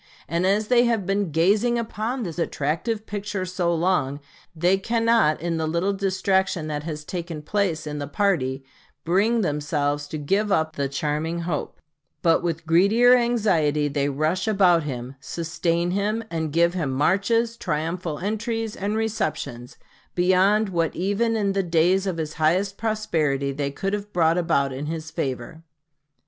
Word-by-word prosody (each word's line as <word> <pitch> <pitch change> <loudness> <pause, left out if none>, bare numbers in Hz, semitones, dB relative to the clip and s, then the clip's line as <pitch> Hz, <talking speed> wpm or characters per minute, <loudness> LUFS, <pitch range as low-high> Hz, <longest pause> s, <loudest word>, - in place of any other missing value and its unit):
And 170 +3 0
as 210 +2 +1
they 245 -1 +5
have 230 -5 +1
been 195 0 0
gazing 200 +10 +2
upon 230 +2 -3
this 175 -3 -5
attractive 170 +9 -2
picture 205 -2 -4
so 180 -1 -1
long, 165 -5 0 0.4
they 180 +4 +2
cannot, 230 -7 +2
in 165 0 -2
the 160 -1 -1
little 170 +5 0
distraction 190 -3 0
that 150 -1 -3
has 150 -1 -6
taken 170 -3 -5
place 180 -3 -1
in 150 -1 -4
the 145 - -4
party, 140 -8 0 0.4
bring 210 +7 +2
themselves 145 -3 -1
to 155 - -5
give 195 +8 0
up 160 -4 +1
the 140 -1 -1
charming 150 +4 -2
hope; 165 -3 -4 0.4
but 165 -1 +4
with 165 -2 -3
greedier 200 +9 +5
anxiety 190 -12 +2
they 140 0 0
rush 155 +7 -1
about 190 -5 +4
him, 130 -2 -6
sustain 170 +4 -1
him, 210 +4 -1
and 160 -2 -2
give 170 +2 +3
him 165 -7 -1
marches, 215 - +1
triumphal 165 -3 -3
entries, 220 - -3
and 205 +3 -2
receptions, 150 - -3 0.4
beyond 190 +4 +3
what 165 -3 -1
even 205 +5 0
in 205 -3 +1
the 195 0 +1
days 180 +2 +2
of 180 -3 -2
his 155 -1 -3
highest 185 +6 +2
prosperity 160 -12 0
they 140 0 -2
could 195 +8 -3
have 205 0 -4
brought 165 -1 +3
about 140 -5 +1
in 140 +3 -5
his 160 0 -5
favor. 140 -1 -4
175 Hz, 160 wpm, -24 LUFS, 155-205 Hz, 0.4 s, they